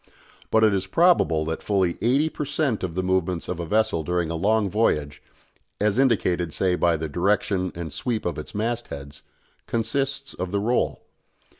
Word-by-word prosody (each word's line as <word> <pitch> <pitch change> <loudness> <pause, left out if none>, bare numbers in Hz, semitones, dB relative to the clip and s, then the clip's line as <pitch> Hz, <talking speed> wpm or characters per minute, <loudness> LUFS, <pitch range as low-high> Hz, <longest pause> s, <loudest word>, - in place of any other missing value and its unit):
But 110 0 +3
it 110 -2 +5
is 95 -1 -1
probable 130 - +3
that 80 +1 -3
fully 95 -4 0
eighty 135 +8 +3
per 155 - -4
cent. 145 -6 -1
of 85 -3 -3
the 95 - -1
movements 90 -2 0
of 90 - -4
a 85 - -4
vessel 105 -4 +1
during 85 +1 -1
a - - -2
long 105 +4 +2
voyage 75 -8 0 0.6
as 105 +3 +1
indicated, 90 -10 +2
say, 95 -2 +1
by 85 -2 +2
the 80 +1 -3
direction 95 +2 0
and 85 -3 -5
sweep 115 -4 -2
of 85 -3 -2
its 75 - -9
mast 115 +3 -1
heads 70 0 -8 0.5
consists 135 +5 -2
of 95 - -4
the 100 +2 0
roll. 120 +5 0
95 Hz, 180 wpm, -24 LUFS, 85-115 Hz, 0.6 s, it